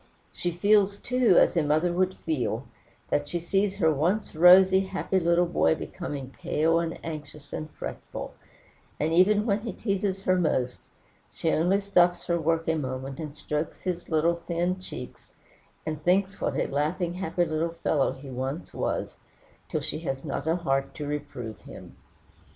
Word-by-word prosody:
She 175 - -2
feels, 200 +3 +3
too, 250 -6 +3
as - - +5
a 170 - +4
mother 155 +4 +2
would 185 +1 +1
feel, 130 -5 -1 0.4
when 145 - +1
she 170 +4 -3
sees 195 +3 0
her 160 -6 +3
once 175 +9 0
rosy, 185 +3 +8
happy 190 0 -1
little 170 0 +3
boy 170 -2 +2
becoming 145 -7 -6
pale, 165 +2 +2
and 165 -1 -3
anxious, 150 -2 -8
and 155 - -4
fretful; - - -7 0.7
and 155 +2 0
even 205 +5 +4
when 205 -2 +2
he 225 +1 -5
teases 195 -2 -2
her 185 -1 +3
most, 130 -7 0 0.5
she 165 - -1
only 180 +5 +3
stops 180 -3 +3
her 170 -1 0
work 165 +1 0
a 160 - +3
moment, 135 -2 -4
and 150 -3 -6
strokes 150 +1 -4
his 175 -2 -3
little 165 +1 +2
thin 175 +2 0
cheeks, 125 -8 -9 0.5
and 155 -1 -3
thinks 190 +3 +2
what - - -1
a - - +1
laughing, 170 +5 -1
happy 175 -1 0
little 165 +1 -1
fellow 145 -4 +2
he 135 +1 -11
once 130 +6 -4
was, - - -2 0.5
till - - -1
she - - -4
has 135 -4 -4
not 150 +1 -3
a 165 - +3
heart 135 -6 -1
to 150 - -5
reprove 145 -7 -5
him. - - -12
165 Hz, 170 wpm, -27 LUFS, 150-185 Hz, 0.7 s, rosy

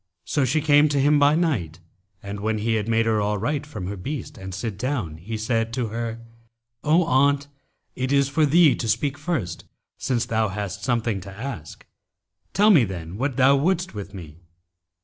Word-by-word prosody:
So 145 -3 +1
she 150 +5 +1
came 145 0 +5
to 145 -1 +1
him 145 +2 +4
by 145 +1 +5
night 115 - -1 0.4
and, 100 0 -6
when 110 +1 -1
he 110 +2 0
had 110 -1 -1
made 115 0 +2
her 110 -1 +2
alight 110 +9 -1
from 105 -11 -6
her 100 +3 -4
beast 130 +8 -6
and 95 0 -8
sit 100 +3 -4
down, 110 - -3
he 110 +7 -5
said 115 +1 -1
to 120 -3 -2
her, 115 +1 -4 0.6
'O 160 +4 +4
aunt, 140 -1 +2 0.5
it 130 +1 -2
is 140 -1 +3
for 150 +3 +1
thee 160 0 +6
to 115 - -3
speak 140 +5 0
first, 130 - -3 0.3
since 120 -3 0
thou 110 -1 +1
hast 100 0 -5
some 120 -3 +1
thing 105 -5 -2
to 95 +2 -9
ask: 100 - -7 0.7
tell 210 +3 +5
me 155 - +6
then 90 -4 -5
what 135 +1 -2
thou 135 +1 +6
wouldst 175 +5 0
with 100 -1 -7
me.' 85 -5 -10
115 Hz, 190 wpm, -24 LUFS, 100-145 Hz, 0.7 s, thee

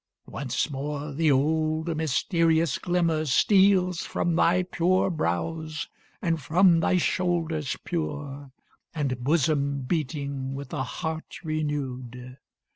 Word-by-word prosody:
Once 130 -4 -2
more 145 +1 -4
the 155 +1 +2
old 155 +3 +1
mysterious 165 +1 +1
glimmer 170 -3 +1
steals 185 +4 +4
From 170 -1 -1
thy 180 +2 +3
pure 185 +1 +1
brows, 155 - -2 0.3
and 165 -3 0
from 170 +4 +4
thy 180 - +2
shoulders 165 -5 0
pure, 145 -4 -4 0.5
And 130 -5 -2
bosom 140 -1 +1
beating 140 -2 -3
with 140 +1 -7
a 145 - -1
heart 160 +5 -5
renew'd. 130 -5 -4
155 Hz, 110 wpm, -26 LUFS, 140-170 Hz, 0.5 s, steals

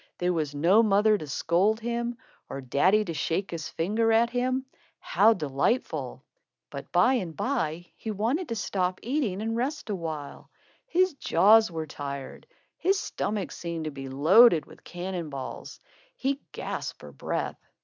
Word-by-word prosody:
There 180 0 +1
was 150 -3 -2
no 175 +9 +5
mother 215 0 +4
to 155 -7 -5
scold 180 +9 +1
him, 235 +1 -3 0.3
or 135 - -5
daddy 180 - +2
to 170 - -4
shake 165 +5 -2
his 165 -3 -5
finger 220 +7 +1
at 230 +1 +3
him. 255 +2 0 0.3
How 220 +3 +4
delightful! 150 - -1 0.5
But - - -8
by 255 - +4
and 180 -11 -2
by, 175 - -1
he 225 - -7
wanted 235 - -1
to 230 - -2
stop 185 -3 -1
eating 235 -6 -1
and 225 +1 -1
rest 265 0 -2
a - - 0
while. 155 -5 -6 0.4
His 370 -6 +2
jaws 220 - +5
were 160 -2 -4
tired. 140 -2 -7 0.3
His 385 +2 +2
stomach 205 - -3
seemed 170 -2 -5
to 155 - -3
be 135 -1 -7
loaded 160 - +6
with - - -16
cannon 175 -2 -5
balls. 135 -2 -7 0.4
He 275 +1 -1
gasped - - -5
for - - -11
breath. - - -3
195 Hz, 160 wpm, -27 LUFS, 160-235 Hz, 0.5 s, loaded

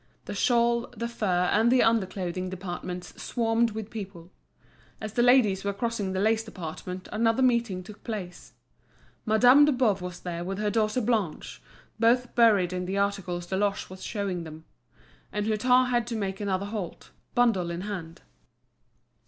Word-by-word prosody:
The - - -5
shawl, 235 -1 +2
the 235 +2 -2
fur, 185 -6 0
and 225 +3 +4
the 255 - +5
under 225 -4 +3
clothing 185 -1 -4
departments 180 -1 -6
swarmed 230 -1 +1
with 220 0 -7
people. 190 -5 -8 0.7
As 215 -1 -6
the 240 - +2
ladies 240 -6 +4
were 200 0 -1
crossing 210 -2 -2
the 190 - -1
lace 220 +2 +2
department 180 -2 -7
another 225 +3 +2
meeting 235 -7 +1
took 205 +3 -13
place. 195 -6 -6 0.7
Madame 245 +6 +6
de 300 - +3
Boves 230 -8 +1
was 180 -1 -6
there 175 -1 -4
with 190 +2 -4
her 210 0 0
daughter 220 +2 +1
Blanche, 215 -8 -2 0.4
both 240 +2 +3
buried 205 -7 +4
in 180 0 -3
the 195 +2 -2
articles 195 -3 -1
Deloche 195 +1 -1
was 185 - -10
showing 195 -5 -3
them. 160 0 -10 0.7
And 210 0 -2
Hutin 250 +4 +3
had 240 -1 +1
to 240 - -3
make 195 -2 -3
another 195 -1 -1
halt, 205 -4 -6 0.2
bundle 225 -8 +2
in 170 +1 -4
hand. 180 -5 -6
205 Hz, 160 wpm, -27 LUFS, 185-230 Hz, 0.7 s, Madame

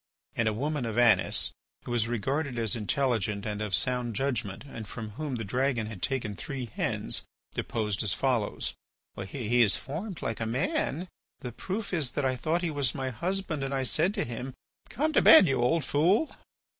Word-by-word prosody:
And 115 - +1
a 110 - +2
woman 140 +2 -1
of 110 0 -4
Anis, 110 -6 +4 0.3
who - - -5
was 120 -2 +1
regarded 130 +4 -1
as 115 0 +1
intelligent 105 -2 0
and 105 -1 -3
of 105 -4 +1
sound 120 +6 0
judgment 120 -4 -2
and 115 -6 -8
from 110 +1 -6
whom 145 +4 -4
the 115 - -3
dragon 125 +2 0
had 105 -4 -8
taken 120 -7 -1
three 135 -1 -5
hens, 110 - -1 0.3
deposed 105 -3 -1
as 105 - +2
follows: 120 -1 0 0.5
"He 120 +1 +1
is 100 -6 +5
formed 170 +7 -6
like 115 - -2
a 115 - -1
man. 135 +7 -1 0.3
The 125 - -5
proof 195 - -4
is 145 -8 0
that 145 - 0
I 130 -1 +1
thought 160 +7 0
he 170 - 0
was 140 -3 0
my 130 -2 -2
husband, 170 - -1
and 135 0 -2
I 135 - 0
said 165 - +1
to - - 0
him, 125 +2 -6 0.3
'Come 310 +4 0
to - - +5
bed, 315 - +9
you 135 -4 +1
old 155 +4 +2
fool. 180 - +2
125 Hz, 190 wpm, -29 LUFS, 110-145 Hz, 0.5 s, bed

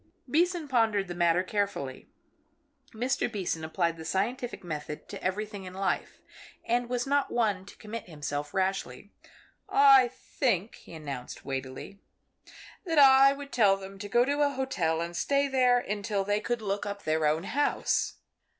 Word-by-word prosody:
Beason 335 +3 +1
pondered 225 -7 +2
the 175 - -5
matter 175 0 +2
carefully. 190 -10 -3 0.8
Mr. 240 +2 -1
Beason 180 -6 -3
applied 165 +1 -1
the 160 - -8
scientific 235 +9 -2
method 150 -3 -6
to - - -8
everything 205 +2 -3
in 185 0 -9
life, 195 0 -2 0.4
and 240 +1 0
was 245 -1 -1
not 285 +1 +1
one 205 -5 0
to - - -13
commit 215 -2 -7
himself 145 -2 -4
rashly. 190 -3 -2 0.6
"I 275 -2 +7
think," 235 -4 -2
he - - -13
announced, 140 -5 -7
weightily, 135 +8 -6 0.8
"that 330 -5 -2
I 275 -1 +8
would 280 0 -9
tell 200 -5 +4
them 195 0 -10
to 205 0 -6
go 240 +4 +4
to 285 +2 0
a 290 - +4
hotel 195 -13 -1
and 170 +1 -4
stay 280 +8 +1
there 255 -2 +4
until 205 -3 -2
they 205 +1 0
could 235 +1 -2
look 200 0 -2
up 200 0 -5
their 155 0 +1
own 155 +3 +1
house." 275 +9 0
205 Hz, 160 wpm, -29 LUFS, 175-250 Hz, 0.8 s, I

